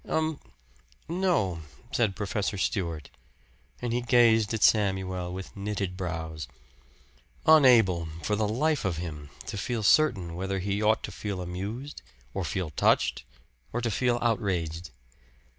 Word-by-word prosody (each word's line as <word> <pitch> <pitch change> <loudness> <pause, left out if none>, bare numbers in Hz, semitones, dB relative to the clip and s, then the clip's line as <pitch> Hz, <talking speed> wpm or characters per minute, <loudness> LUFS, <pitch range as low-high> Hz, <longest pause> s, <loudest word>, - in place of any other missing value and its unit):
"Um 160 -1 0 0.7
no," 165 - 0 0.3
said 110 -5 +1
Professor 100 0 -2
Stewart; 85 - -2 0.7
and 120 -1 -1
he 120 - +1
gazed 115 -3 +4
at 110 -2 0
Samuel 95 -4 +2
with 95 +1 -7
knitted 100 -2 -3
brows 80 -4 -4 1.0
unable, 115 - +6 0.2
for 105 - +1
the 105 0 0
life 145 +8 +1
of 95 -4 -1
him, 75 -4 -6 0.2
to 100 - -5
feel 115 +1 -2
certain 100 - +3
whether 95 +3 -2
he 100 +2 -1
ought 110 +1 +3
to - - -5
feel 100 -3 -4
amused, 100 +11 -5 0.3
or 95 - -2
to - - -3
feel 90 -5 -2
touched, 70 - +2 0.5
or 120 - -1
to 120 -1 -1
feel 120 +3 +1
outraged. 90 -8 -1
100 Hz, 140 wpm, -28 LUFS, 90-115 Hz, 1.0 s, unable